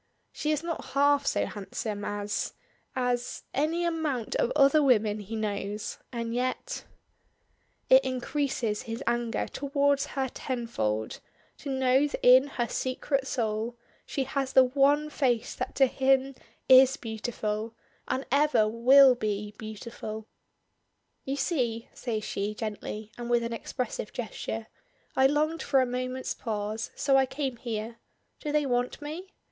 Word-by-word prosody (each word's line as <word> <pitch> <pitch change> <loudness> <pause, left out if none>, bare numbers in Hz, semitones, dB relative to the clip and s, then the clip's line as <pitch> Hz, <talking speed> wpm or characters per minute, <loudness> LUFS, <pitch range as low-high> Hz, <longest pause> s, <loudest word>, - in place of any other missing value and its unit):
She 300 - -3
is 305 +1 0
not 335 -1 -3
half 285 0 +4
so - - +2
handsome 205 +1 -5
as 205 0 -2 0.4
as 245 -1 -1
any 325 +5 +1
amount 310 -9 -1
of - - +1
other 285 +1 +6
women 215 -6 +3
he 210 +2 -6
knows, 210 -1 -3
and 230 -2 -3
yet 255 - -2 1.0
It 260 +1 +7
increases 260 -3 -1
his 230 +3 -5
anger 235 -1 0
towards 280 0 +1
her 265 -1 +1
tenfold 170 - -3 0.4
to 285 - -6
know 265 +1 +3
that - - -5
in 255 +2 +8
her 240 -4 -2
secret 265 +2 -1
soul 225 -1 -2 0.3
she 275 - -2
has 270 0 -2
the 260 - +8
one 285 +3 +3
face 245 -6 0
that - - -5
to 270 - +6
him 265 +1 +2 0.3
is 260 +1 +7
beautiful, 220 -1 -4 0.3
and 265 - -1
ever 280 -6 +4
will 255 +4 +7
be 210 -3 -3
beautiful. 220 0 -7 1.0
"You 270 - -1
see," 245 -7 -1
says 220 -4 -3
she 205 +1 -3
gently, 215 -1 -5
and 240 0 -5
with 240 -1 +3
an 230 0 -3
expressive 230 -2 -4
gesture, 225 -1 -4 0.5
"I 265 0 +6
longed 305 +3 0
for 280 -2 +3
a 260 - +4
moment's 255 +1 -3
pause, 215 -1 -3
so 270 -1 +3
I 265 -1 +4
came 265 -2 -3
here. 230 -1 -4 0.4
Do 300 - -3
they 300 -1 +2
want 245 -1 0
me?" 320 +6 -7
250 Hz, 140 wpm, -28 LUFS, 220-275 Hz, 1.0 s, in